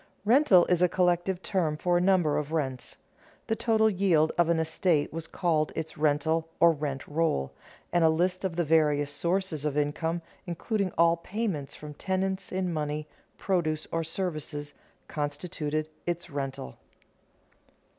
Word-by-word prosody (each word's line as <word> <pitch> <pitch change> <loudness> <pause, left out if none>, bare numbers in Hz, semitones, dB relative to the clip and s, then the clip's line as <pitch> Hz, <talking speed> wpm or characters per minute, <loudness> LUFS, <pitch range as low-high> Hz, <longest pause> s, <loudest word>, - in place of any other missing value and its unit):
Rental 220 - +6
is 180 -1 +1
a 180 - +5
collective 180 +1 +1
term 165 -6 0
for 175 +2 +1
a 175 - +3
number 180 -6 +3
of 150 0 -5
rents. 135 -6 -3 0.5
The 225 - 0
total 220 -1 +3
yield 180 -6 +3
of 170 -1 +3
an 170 - +3
estate 160 -1 +1
was 165 0 -4
called 160 -4 0
its 160 0 -4
rental 160 +2 +1
or 170 - +7
rent 145 -3 -4
roll, 150 - 0 0.4
and 175 -1 +3
a 160 - +6
list 180 +4 0
of 185 -3 -2
the 175 - +1
various 150 -2 +2
sources 170 +1 -1
of 150 -1 -1
income, 160 +3 -1 0.2
including 195 +3 -1
all 170 0 +5
payments 180 -5 -3
from 150 0 -9
tenants 190 +3 -2
in 185 -2 -1
money, 150 0 -3 0.3
produce 160 -5 0
or 165 0 0
services, 155 -4 -4 0.3
constituted 150 +1 -3 0.2
its 175 -1 -3
rental. 135 - -5
165 Hz, 150 wpm, -28 LUFS, 150-180 Hz, 0.5 s, or